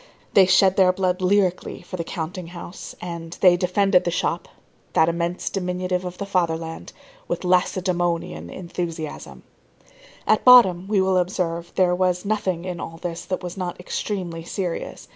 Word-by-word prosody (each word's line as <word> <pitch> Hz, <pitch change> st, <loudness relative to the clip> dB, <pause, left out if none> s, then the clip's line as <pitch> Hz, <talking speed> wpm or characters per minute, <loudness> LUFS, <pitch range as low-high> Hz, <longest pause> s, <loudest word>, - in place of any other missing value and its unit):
They 190 Hz, -2 st, +6 dB
shed 190 Hz, 0 st, +4 dB
their 185 Hz, -2 st, +6 dB
blood 185 Hz, 0 st, -1 dB
lyrically 185 Hz, -2 st, +1 dB
for 180 Hz, -, -7 dB
the 170 Hz, -, -3 dB
counting 175 Hz, +1 st, -5 dB
house; 175 Hz, +1 st, -9 dB
and 170 Hz, -1 st, -6 dB
they 180 Hz, -2 st, +6 dB
defended 185 Hz, +1 st, +2 dB
the -, -, 0 dB
shop, 175 Hz, -, -1 dB, 0.5 s
that 160 Hz, -, +4 dB
immense 170 Hz, +1 st, -2 dB
diminutive 180 Hz, -1 st, -2 dB
of 180 Hz, 0 st, -6 dB
the 200 Hz, -, -4 dB
fatherland, 165 Hz, -4 st, -2 dB, 0.4 s
with -, -, -2 dB
Lacedæmonian 175 Hz, -, 0 dB
enthusiasm. 170 Hz, -3 st, -6 dB, 0.8 s
At -, -, +3 dB
bottom, 195 Hz, -8 st, +7 dB
we 205 Hz, -2 st, +2 dB
will 190 Hz, 0 st, +2 dB
observe, 175 Hz, -2 st, -1 dB
there 180 Hz, -1 st, +3 dB
was 180 Hz, 0 st, 0 dB
nothing 195 Hz, -5 st, -1 dB
in 180 Hz, -2 st, -4 dB
all 165 Hz, -1 st, -7 dB
this 170 Hz, -1 st, -5 dB
that 185 Hz, -1 st, -3 dB
was 180 Hz, +1 st, -6 dB
not 180 Hz, -2 st, -4 dB
extremely 180 Hz, -3 st, -4 dB
serious. 175 Hz, 0 st, -4 dB
180 Hz, 155 wpm, -23 LUFS, 170-185 Hz, 0.8 s, bottom